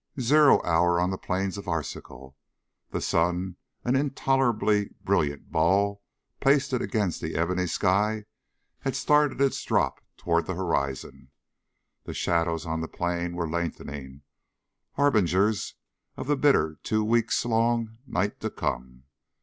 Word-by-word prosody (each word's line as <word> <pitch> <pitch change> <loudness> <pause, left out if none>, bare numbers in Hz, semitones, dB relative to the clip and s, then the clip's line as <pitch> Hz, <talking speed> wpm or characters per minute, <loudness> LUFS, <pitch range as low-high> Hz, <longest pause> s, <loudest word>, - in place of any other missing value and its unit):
Zero 145 +4 +5
hour 85 +1 +3
on 90 +1 +1
the - - -1
plains 95 +2 -2
of 100 - -10
Arzachel. 70 -5 -5 0.5
The - - -3
sun, 90 +2 0 0.3
an 125 +2 +1
intolerably 135 -7 +1
brilliant 70 -1 0
ball 100 +5 +2 0.4
pasted 135 -2 +2
against 105 -7 -1
the - - -4
ebony 90 +3 0
sky, 105 +5 +1 0.5
had 135 -1 -3
started 150 0 +2
its 135 -1 +1
drop - - 0
toward 85 -1 0
the 95 - -2
horizon. 70 -6 -3 0.8
The - - -6
shadows 85 -1 0
on 80 0 -2
the 80 - -3
plain 85 0 -2
were 85 -1 -2
lengthening, 70 -5 -5 0.7
harbingers 105 -6 +2 0.4
of - - -5
the 145 +2 +2
bitter 130 - +2
two 110 0 0
weeks 115 +2 +1
long 115 -1 0
night 100 0 -1
to - - -2
come. 65 +1 -4
95 Hz, 130 wpm, -26 LUFS, 85-115 Hz, 0.8 s, Zero